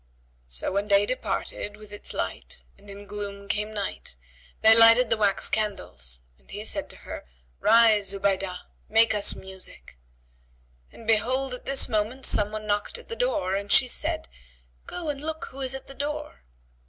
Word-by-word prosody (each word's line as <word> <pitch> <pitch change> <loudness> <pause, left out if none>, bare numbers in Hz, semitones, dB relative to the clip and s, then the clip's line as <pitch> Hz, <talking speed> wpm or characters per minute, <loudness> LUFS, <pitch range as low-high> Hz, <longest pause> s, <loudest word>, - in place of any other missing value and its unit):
So - - -2
when 200 +2 -1
day 200 0 +4
departed 210 -3 -3
with 210 -1 -13
its 205 - -7
light - - -5
and 205 - -17
in 200 +1 -9
gloom 200 -1 -5
came 210 +1 -1
night, 200 - -4 0.5
they 220 0 +9
lighted 230 +1 +7
the - - +5
wax 205 -2 +2
candles 90 - -3 0.2
and 65 -1 -30
he - - -6
said - - -3
to - - -11
her, - - -9 0.3
"Rise, 220 -3 +5
Zubaydah, 195 -2 -1 0.3
make 225 +1 +5
us 205 -1 +2
music;" 190 - -8 0.9
and 230 - -13
behold, 250 +4 +2
at 250 - -8
this 275 0 +3
moment 225 +3 -1
some 210 0 +2
one 215 0 -5
knocked 205 - -1
at 475 - -13
the 460 - -4
door, 480 - 0
and 200 +1 -3
she 255 - +6
said, 240 - -2 0.6
"Go 350 -2 -5
and 280 -1 -3
look 315 +1 -4
who 270 +1 -8
is 265 0 -1
at 265 - -7
the 275 - -9
door." 295 - -5
210 Hz, 175 wpm, -26 LUFS, 200-250 Hz, 0.9 s, they